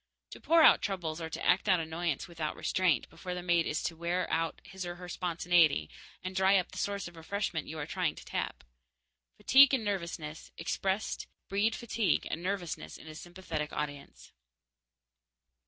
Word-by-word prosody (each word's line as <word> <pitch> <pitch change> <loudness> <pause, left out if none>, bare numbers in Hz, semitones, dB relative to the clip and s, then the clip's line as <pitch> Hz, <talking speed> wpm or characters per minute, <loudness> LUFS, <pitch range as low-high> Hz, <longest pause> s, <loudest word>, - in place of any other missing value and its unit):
To - - -10
pour 330 0 +5
out - - +8
troubles 170 -5 -3
or 160 - -4
act 185 +3 +3
out 185 -2 +5
annoyance 160 -1 -2
without 160 -3 -4
restraint 180 -9 +1
before 180 +2 -6
the 180 - -5
mate 175 -1 +2
is 150 - -1
to 165 - -2
wear 170 +2 -1
out 165 0 0
his 190 -1 -7
or 175 0 -5
her 180 0 -9
spontaneity 170 - +2 0.3
and 185 0 -5
dry 190 +1 +5
up 180 - -1
the - - -6
source 200 -1 -2
of 175 - -12
refreshment 165 -1 -3
you 160 - -6
are 145 - -3
trying - - -1
to - - -11
tap. - - -3 0.7
Fatigue 275 +1 +7
and 230 -5 -3
nervousness, 170 -6 -4
expressed, 190 +5 -2 0.2
breed 205 +3 +2
fatigue 230 -3 0
and 165 - -3
nervousness 175 - -3
in - - -14
a 155 - -8
sympathetic 165 -2 -5
audience. 145 -1 -6
175 Hz, 170 wpm, -31 LUFS, 160-190 Hz, 0.7 s, out